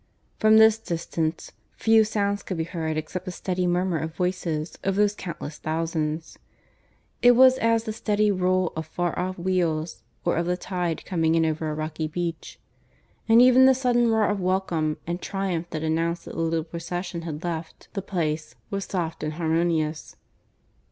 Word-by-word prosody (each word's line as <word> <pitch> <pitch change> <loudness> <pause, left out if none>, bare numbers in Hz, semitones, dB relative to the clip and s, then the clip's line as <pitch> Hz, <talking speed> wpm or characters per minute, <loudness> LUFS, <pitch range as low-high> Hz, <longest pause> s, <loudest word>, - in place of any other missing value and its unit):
From 215 0 +6
this 220 0 +6
distance 165 -4 -3 0.2
few 225 0 +4
sounds 205 -1 -1
could 185 - -5
be 160 - 0
heard 160 -2 -3
except 165 +4 -4
the 185 - -4
steady 180 0 -2
murmur 175 -1 +1
of 160 0 -5
voices 175 -3 -2
of 195 0 0
those 205 0 +3
countless 170 -6 -7
thousands. 160 0 -3 0.8
It 245 0 +7
was 260 +1 +6
as 230 0 +2
the 220 - -4
steady 210 -1 +1
roll 185 -1 +1
of 160 0 -4
far 175 -1 -2
off 185 +1 -2
wheels 170 -3 -1 0.2
or - - +1
of 170 +1 0
the 180 0 0
tide 175 -3 -3
coming 165 -3 +1
in 165 -1 +3
over 160 0 -1
a 150 - -3
rocky 155 0 -3
beach; 170 +1 -4 0.7
and 230 +2 +8
even 255 +1 +7
the 265 - +6
sudden 245 -2 +2
roar 220 -1 +3
of 205 -2 -1
welcome 180 -4 0
and 175 +2 -3
triumph 185 -4 -2
that 155 -1 -4
announced 165 +2 -1
that - - -8
the - - -3
little 165 -1 0
procession 170 +1 -5
had 160 -2 -6
left 165 -2 -5
the 200 - -2
Place 160 -5 -3 0.2
was 195 -1 -2
soft 170 -4 -3
and 155 0 -3
harmonious. 160 -1 -1
175 Hz, 175 wpm, -25 LUFS, 160-195 Hz, 0.8 s, and